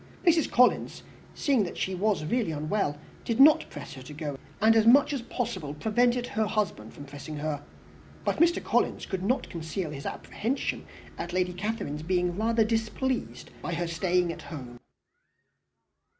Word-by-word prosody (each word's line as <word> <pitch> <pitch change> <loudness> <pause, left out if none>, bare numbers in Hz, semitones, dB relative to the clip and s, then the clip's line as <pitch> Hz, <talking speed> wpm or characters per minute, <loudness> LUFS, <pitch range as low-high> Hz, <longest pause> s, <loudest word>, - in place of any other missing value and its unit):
Mrs. 330 -3 +4
Collins, 250 0 +3 0.3
seeing 275 -6 +2
that 175 - -5
she 190 - -1
was 195 -3 0
really 230 +3 0
unwell, 155 0 -1 0.3
did 230 +1 -2
not 300 +3 +7
press 145 - -8
her 130 - -9
to 130 +3 -10
go, 150 -2 -4 0.2
and 220 +1 +5
as 220 0 +4
much 275 +4 +6
as 275 - -2
possible 205 - -4
prevented 240 +7 +2
her 220 -3 -1
husband 190 - -2
from 145 - -10
pressing 145 +2 -8
her; 145 -1 -2 0.6
but - - +1
Mr. 340 +1 +4
Collins - - +1
could 190 -3 -3
not 240 +8 0
conceal 165 0 -4
his 140 -1 -6
apprehension 250 +6 -3 0.3
of - - -4
Lady 180 0 +1
Catherine's 180 -6 -3
being 180 +1 0
rather 225 +2 +2
displeased 225 +3 -2
by 175 - -3
her 175 +1 -1
staying 175 +1 +1
at - - -10
home. 125 -7 -8
190 Hz, 165 wpm, -28 LUFS, 155-230 Hz, 0.6 s, not